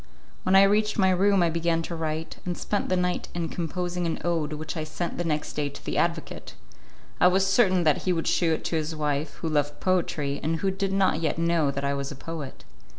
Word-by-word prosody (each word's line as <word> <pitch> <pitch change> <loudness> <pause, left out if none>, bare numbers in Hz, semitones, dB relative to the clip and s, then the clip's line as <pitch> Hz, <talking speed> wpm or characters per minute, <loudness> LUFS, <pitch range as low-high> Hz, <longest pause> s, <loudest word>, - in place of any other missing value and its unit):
When 185 - +2
I 195 - +9
reached 210 +2 +2
my 190 -2 +4
room 195 0 +3
I 170 - +2
began 165 0 0
to 170 - -5
write, 160 0 -3
and 175 -1 -3
spent 205 - -2
the 185 - +2
night 180 0 -1
in 170 -2 -2
composing 175 +1 -2
an 165 - -1
ode 165 -3 0
which 155 +3 -5
I 160 - -2
sent 170 +3 -4
the - - +1
next 155 -3 -2
day 145 -1 -1
to 140 - -12
the - - -3
advocate. - - -2 0.6
I - - +6
was 190 +1 +3
certain 190 -3 +3
that 155 -3 +3
he 185 - 0
would 165 -2 -1
shew 170 -2 +2
it - - -3
to - - -1
his 160 0 -2
wife, 150 0 -2
who - - 0
loved 145 -2 0
poetry, 155 -6 0
and 160 +2 0
who 195 - +1
did 195 0 -2
not 190 -4 +2
yet 155 -2 0
know 165 -3 +2
that 140 0 -2
I 140 - +1
was 140 0 -3
a - - -6
poet. 150 -1 -7
165 Hz, 235 wpm, -26 LUFS, 155-185 Hz, 0.6 s, I